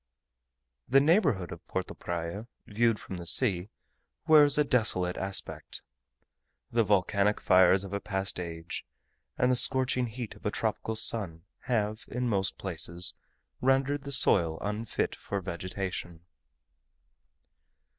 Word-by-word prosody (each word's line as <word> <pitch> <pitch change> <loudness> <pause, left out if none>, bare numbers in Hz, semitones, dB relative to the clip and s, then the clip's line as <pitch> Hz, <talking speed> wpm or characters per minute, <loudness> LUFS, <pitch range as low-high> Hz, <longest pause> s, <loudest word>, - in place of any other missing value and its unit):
The 135 +2 +5
neighbourhood 145 - +2
of - - -9
Porto - - -3
Praya, 85 +6 -5 0.2
viewed 115 +1 +1
from 95 - -8
the 85 - -8
sea, 95 -3 +1 0.6
wears 150 -3 +6
a 150 - +5
desolate 100 -9 +1
aspect. 95 0 -4 0.9
The 115 0 +3
volcanic 100 +1 +2
fires 95 0 +5
of 100 0 -8
a 100 - -1
past 95 -2 -3
age, 85 -1 -6 0.5
and 125 0 +3
the - - +3
scorching 130 0 +3
heat 115 0 -6
of - - -19
a - - 0
tropical 110 +1 -2
sun, 100 -7 -1 0.2
have 110 -3 -1
in 125 0 -2
most 100 -4 0
places 85 -1 -1 0.5
rendered 135 +2 +2
the 140 +1 -7
soil 85 -11 +4
unfit 105 +3 -2
for 100 - -4
vegetation. 90 -1 -5
105 Hz, 125 wpm, -29 LUFS, 90-125 Hz, 0.9 s, wears